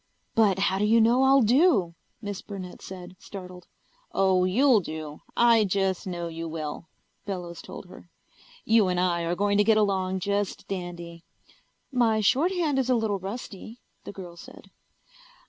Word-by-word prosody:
"But 210 -4 +3
how 195 0 +1
do 210 - +2
you 225 +2 +4
know 235 +3 +4
I'll 270 -1 +5
do?" 230 - +3 0.3
Miss 205 -2 -5
Burnett 190 -3 -8
said, 185 -1 -9
startled. 180 -2 -10 0.4
"Oh, 190 -1 +3
you'll 240 +5 +4
do. 155 -4 -7 0.2
I 235 -2 +5
just 195 -1 -1
know 175 -2 -4
you 165 0 -6
will," 155 0 -6 0.4
Bellows 175 -4 -5
told - - -10
her. - - -14 0.6
"You 220 -3 +4
and 180 -1 0
I 175 -1 +1
are 170 +1 -1
going 200 +2 +1
to - - +6
get 220 +1 +4
along 190 -3 0
just 200 0 -2
dandy." 175 -3 -6 0.7
"My 235 -4 +2
shorthand 295 - +2
is 260 -1 -1
a 255 - +4
little 220 -4 0
rusty," 210 +3 -8 0.2
the - - -7
girl 180 -4 -10
said. 170 - -14
195 Hz, 160 wpm, -26 LUFS, 180-225 Hz, 0.7 s, to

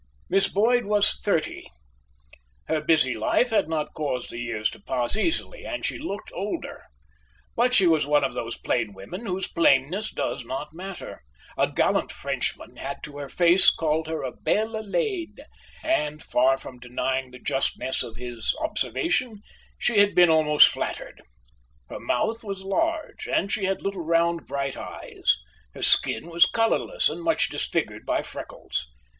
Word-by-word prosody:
Miss 195 +1 +3
Boyd 235 +4 +2
was 205 0 +3
thirty. 165 -6 -1 1.0
Her 155 - 0
busy 150 -5 +3
life 120 - +1
had 210 -7 +2
not 155 -2 -2
caused 140 -5 -3
the 120 - -6
years 115 -2 -1
to - - -12
pass 125 +2 -1
easily, 335 - -1
and 300 - -4
she - - -2
looked 215 -9 -6
older. 200 +3 -5 0.7
But 250 +2 +3
she 195 - +5
was 160 -4 +3
one 145 -1 +3
of 135 - 0
those 115 -1 -4
plain 115 -4 -1
women 175 - -8
whose 190 0 -1
plainness 170 +7 +2
does 135 - -3
not 135 +5 -5
matter. 190 +3 -8 0.3
A - - +1
gallant - - +1
Frenchman - - -4
had - - -6
to 145 -1 -8
her 140 -1 -6
face 175 +1 +5
called 160 0 0
her 160 -2 -3
a 130 - -3
belle 220 - -1
laide, 365 - -2 0.4
and, 150 - 0
far 130 +2 +3
from 125 -2 -11
denying 130 +1 -2
the 125 - -11
justness 130 +1 -1
of 115 - -6
his 120 -2 -3
observation, 255 - -1 0.3
she 230 -4 +2
had 205 0 +4
been 175 -2 +7
almost 150 -2 +7
flattered. - - -4 0.7
Her - - -6
mouth 225 - -1
was 195 -2 -5
large, 320 +11 -1
and 200 - 0
she 200 - 0
had 195 0 -1
little 195 -3 -2
round 170 +1 +1
bright 140 -1 -2
eyes. - - -1 0.4
Her - - -6
skin 110 - +3
was 170 +1 +6
colourless 230 - +1
and - - -4
much 325 -1 +2
disfigured - - -2
by - - +1
freckles. - - -5
170 Hz, 160 wpm, -25 LUFS, 135-215 Hz, 1.0 s, been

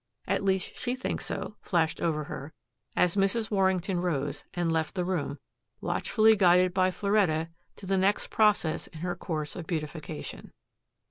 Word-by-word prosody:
"At - - 0
least 190 -1 0
she 250 0 -1
thinks 260 - -3
so," 210 - -4
flashed 165 -4 0
over 155 -2 0
her, 145 +1 -7 0.4
as 180 0 +3
Mrs. 210 +3 +1
Warrington 190 -2 +1
rose, 145 -5 -1
and 175 -2 +1
left 160 +1 -1
the 180 -2 0
room, 170 -6 -2 0.4
watchfully 220 -1 +3
guided 180 -2 +5
by 185 0 +3
Floretta 185 -5 +1 0.3
to 200 - -10
the 195 0 +1
next 195 +2 +1
process 210 -7 +2
in 155 - -11
her 175 0 -2
course 155 -4 -4
in - - -4
beautification. 155 - -5
180 Hz, 155 wpm, -29 LUFS, 160-195 Hz, 0.4 s, guided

